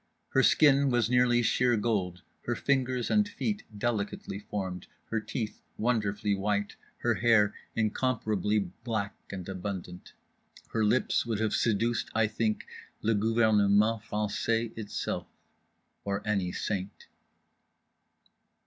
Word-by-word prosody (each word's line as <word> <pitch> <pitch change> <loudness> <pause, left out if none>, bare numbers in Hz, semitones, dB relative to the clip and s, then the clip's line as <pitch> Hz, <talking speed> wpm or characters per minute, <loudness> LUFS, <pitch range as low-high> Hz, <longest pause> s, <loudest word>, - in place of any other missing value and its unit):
Her 135 - +3
skin 140 0 +5
was 120 -2 +1
nearly 125 -1 +4
sheer 120 0 +3
gold; 95 -5 -1 0.2
her 120 - 0
fingers 130 -2 0
and 210 -1 +3
feet 210 0 -3
delicately 100 -3 -2
formed: 95 -3 -5 0.2
her 115 - +1
teeth 110 0 -5 0.2
wonderfully 105 -3 0
white; 100 +1 -1 0.3
her - - +2
hair 105 -3 +4 0.2
incomparably 110 -2 0 0.3
black 110 -4 -2 0.2
and 95 -3 -6
abundant. 95 -2 -6 0.6
Her 110 - 0
lips 115 +5 +2
would 110 -3 -1
have 110 -1 0
seduced, 115 +1 +1
I 115 0 +4
think, 110 0 -1 0.4
le 115 - +3
gouvernement 110 0 +3
français 110 +2 -1
itself. 110 -2 -4 0.8
Or 100 +1 -3
any 100 -4 0
saint. 100 0 -4
110 Hz, 115 wpm, -29 LUFS, 100-120 Hz, 0.8 s, skin